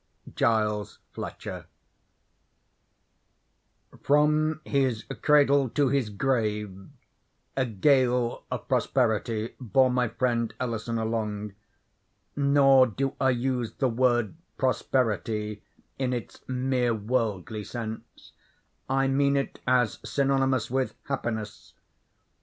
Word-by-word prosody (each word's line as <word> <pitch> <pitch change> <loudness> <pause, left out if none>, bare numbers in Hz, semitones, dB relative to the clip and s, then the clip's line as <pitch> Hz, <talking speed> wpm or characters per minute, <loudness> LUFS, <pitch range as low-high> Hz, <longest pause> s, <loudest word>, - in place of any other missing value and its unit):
—Giles 105 -2 0
Fletcher. - - -7 2.4
From 150 +2 +2
his 130 -6 0 0.2
cradle 140 -3 +4
to 140 +2 +1
his 135 -4 0
grave 105 -4 -2 0.7
a 130 -2 +1
gale 125 +2 +2
of - - -5
prosperity 115 -3 0
bore 130 +2 +3
my 125 -1 +1
friend 115 0 -1
Ellison 115 -1 -2
along. 105 -2 -2 0.8
Nor 140 -2 +5
do 135 +4 -2
I 130 - +4
use 125 -2 -1
the 130 - +1
word 120 -2 +1 0.2
prosperity 110 -5 -1 0.4
in 130 -2 0
its 120 -5 -6
mere 125 -2 0
worldly 110 -2 -2
sense. 110 0 -8 0.6
I 135 0 +2
mean 140 +1 +2
it 140 - -3
as 125 -3 +2
synonymous 135 -4 +1
with 130 0 -1
happiness. 110 -6 -4
125 Hz, 95 wpm, -27 LUFS, 110-135 Hz, 2.4 s, Nor